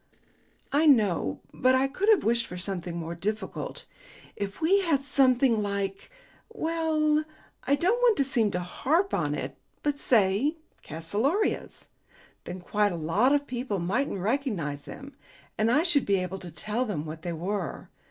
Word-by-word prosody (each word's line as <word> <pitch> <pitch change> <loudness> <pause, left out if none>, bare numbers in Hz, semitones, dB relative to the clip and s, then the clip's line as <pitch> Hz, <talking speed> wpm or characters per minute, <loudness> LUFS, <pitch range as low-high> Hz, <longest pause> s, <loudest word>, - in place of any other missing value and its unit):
"I 300 +3 +3
know. 200 - +3
But 255 +1 +3
I 265 +1 +3
could 375 +10 -1
have 425 -6 +5
wished 235 +1 +1
for 180 - -7
something 180 -2 -3
more 165 0 -4
difficult. 215 - -4 0.5
If 200 -1 -5
we 355 +5 +4
had 320 -8 +1
something 260 -4 +3
like 200 -1 -3 0.4
well, 320 -6 +1 0.4
I 280 - +3
don't 370 +11 +1
want 475 -4 +4
to 275 - +3
seem 240 -5 +1
to 180 -2 -2
harp 320 - 0
on - - 0
it, - - -5 0.3
but 290 -1 0
say 225 - +2 0.3
calceolarias, 210 - -1 0.6
then 180 0 -6
quite 205 +3 +1
a - - -3
lot 170 - +2
of 285 0 +2
people 245 -5 -3
mightn't 200 +8 -1
recognize 195 - -2
them, 275 0 -10 0.4
and 215 +1 +1
I 295 +7 +4
should 325 -7 +2
be 200 - +3
able 185 0 -3
to 175 -2 -8
tell 215 +9 -1
them 195 -11 -3
what 155 +1 -7
they 175 +1 -4
were. 180 +1 -4
230 Hz, 160 wpm, -27 LUFS, 185-285 Hz, 0.6 s, have